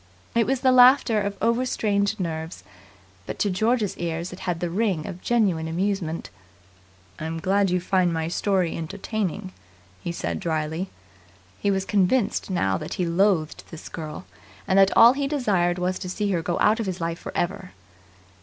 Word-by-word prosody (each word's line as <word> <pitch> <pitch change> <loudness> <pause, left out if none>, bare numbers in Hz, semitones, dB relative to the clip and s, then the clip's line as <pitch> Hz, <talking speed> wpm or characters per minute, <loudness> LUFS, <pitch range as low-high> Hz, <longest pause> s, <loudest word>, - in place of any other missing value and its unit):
It 230 -1 +2
was 265 0 0
the 260 - +4
laughter 250 -3 +6
of 200 0 -3
over 235 +2 +2
strained 205 -4 0
nerves, 160 - -4 0.6
but - - -5
to 205 - +1
George's 220 +2 +1
ears 170 +1 -3
it 180 - -10
had 170 -2 -1
the 175 -1 -2
ring 190 -5 0
of 180 - -7
genuine 195 -9 +1
amusement. 170 -1 -2 0.9
"I'm 160 +1 -4
glad 195 +2 +2
you 180 0 +1
find 180 -1 +1
my 160 -1 -1
story 185 0 0
entertaining," 190 +2 -4 0.5
he 175 - -2
said 85 - -3
dryly. 160 +3 -2 0.7
He 205 - 0
was 190 -1 0
convinced 205 +4 +1
now 95 - 0
that - - -5
he 180 - -1
loathed 170 -2 +1
this 165 - -9
girl, 155 - -7 0.4
and 190 - +4
that 195 0 +6
all 235 +2 +9
he 275 0 -1
desired 200 -11 +1
was 180 +1 -1
to 180 - -6
see 205 +2 -1
her 175 -3 0
go 170 +1 -2
out 215 +3 +3
of 225 - -2
his 185 -1 -3
life 165 0 -3
for - - -7
ever. 185 +1 -2
185 Hz, 175 wpm, -24 LUFS, 170-210 Hz, 0.9 s, all